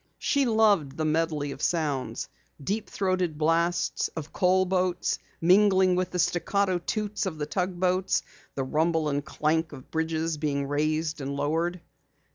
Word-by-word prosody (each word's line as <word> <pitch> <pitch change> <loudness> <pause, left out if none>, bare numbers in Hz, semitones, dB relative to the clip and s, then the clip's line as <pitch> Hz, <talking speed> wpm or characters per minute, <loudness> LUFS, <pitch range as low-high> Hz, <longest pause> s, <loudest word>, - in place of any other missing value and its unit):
She 280 -1 +1
loved 205 - +3
the 155 - -1
medley 155 -2 0
of - - -8
sounds, 150 -6 -1 0.3
deep 205 +10 -3
throated 185 -5 -1
blasts 165 +3 +1
of 160 -1 -6
coal 185 +1 +3
boats 180 -1 0 0.2
mingling 190 +1 +5
with 185 0 0
the 180 - -4
staccato 180 +2 +1
toots 205 +2 -2
of 165 -4 -4
the 150 - -2
tugboats, 185 +1 0 0.3
the 135 - -1
rumble 160 +3 +1
and 145 0 -1
clank 160 +2 -1
of 130 -3 -12
bridges 160 0 -1
being 140 -2 -1
raised 155 +2 -1
and 140 +1 -3
lowered. 165 +5 -1
165 Hz, 145 wpm, -27 LUFS, 155-185 Hz, 0.3 s, mingling